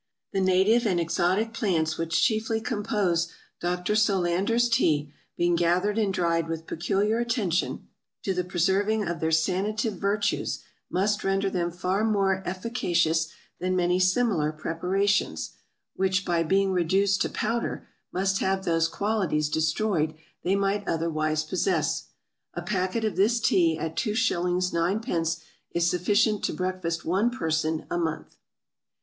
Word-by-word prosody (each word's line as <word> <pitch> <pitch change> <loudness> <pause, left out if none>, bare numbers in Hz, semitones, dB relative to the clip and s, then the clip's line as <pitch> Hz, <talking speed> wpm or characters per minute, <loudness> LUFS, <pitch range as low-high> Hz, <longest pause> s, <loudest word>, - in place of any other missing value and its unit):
The 195 - +1
native 190 +6 +3
and 180 -4 +1
exotic 180 +6 +1
Plants 165 -8 0
which 165 0 +1
chiefly 220 -1 +1
compose 205 -6 0 0.3
Dr. 180 +3 -1
Solander's 200 +3 +2
Tea, 150 -10 +1 0.2
being 175 0 +2
gathered 180 +5 +1
and 205 -3 +1
dried 170 -3 0
with 165 0 -4
peculiar 200 +8 0
attention, 225 -7 -1 0.4
to 195 - 0
the 180 0 -1
preserving 195 +4 +1
of 170 -1 -3
their 160 - 0
sanative 195 +5 0
Virtues, 205 +1 -1 0.3
must 200 +3 0
render 195 0 +1
them 175 -2 0
far 185 +4 -1
more 195 -3 +2
efficacious 175 -5 0 0.3
than 185 +1 0
many 180 0 +2
similar 185 -5 +2
Preparations, 185 +6 -1 0.4
which 190 0 +1
by 170 -1 +1
being 195 +3 +2
reduced 190 +2 +2
to - - +1
Powder, 230 +2 -2 0.2
must 195 +1 0
have 190 0 0
those 165 -1 +2
Qualities 185 -6 0
destroyed 160 +1 0 0.3
they 190 +2 +2
might 200 +1 0
otherwise 155 -2 0
possess. 185 - 0 0.5
A - - -4
Packet 190 +3 -1
of 215 - -2
this 220 +5 +3
Tea 170 -7 +3
at 160 0 -4
2s. 185 -6 0
9d. 170 -2 0 0.3
is 170 0 +2
sufficient 205 +4 +2
to - - -1
Breakfast 185 -2 -3
one 195 +8 +2
Person 160 -9 -1
a 175 - 0
Month. 160 -2 -3
185 Hz, 135 wpm, -26 LUFS, 170-205 Hz, 0.5 s, native